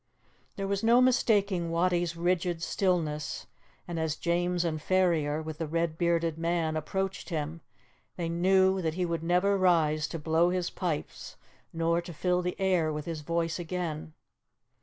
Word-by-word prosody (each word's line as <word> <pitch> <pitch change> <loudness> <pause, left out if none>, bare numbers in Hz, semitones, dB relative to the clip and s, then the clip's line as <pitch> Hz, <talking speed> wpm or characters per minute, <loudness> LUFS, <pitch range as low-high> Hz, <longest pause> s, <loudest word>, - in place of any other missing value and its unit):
There 195 -1 -3
was 200 +2 -1
no 235 +2 +6
mistaking 205 -8 +2
Wattie's 175 0 +1
rigid 175 -1 0
stillness, 160 -7 -1 0.4
and 170 -1 -3
as 160 -2 -1
James 175 +1 0
and 155 -2 -2
Ferrier, 160 -4 +1
with 155 -1 -7
the 165 - -2
red 165 0 -1
bearded 170 -2 +1
man, 165 -1 0
approached 190 +6 -3
him, 160 0 -3 0.5
they 170 -2 -3
knew 190 +3 +3
that 160 -2 -1
he 180 0 0
would 165 -2 -2
never 180 +4 +2
rise 155 -4 +3
to 165 - -5
blow 160 +2 +2
his 180 -1 -1
pipes 170 -5 -4 0.4
nor 165 +1 +1
to 170 0 -9
fill 180 +3 +1
the 180 +2 -3
air 180 -5 +2
with 150 -1 -4
his 165 -2 -4
voice 170 +2 -1
again. 165 -3 -4
170 Hz, 160 wpm, -29 LUFS, 160-180 Hz, 0.5 s, no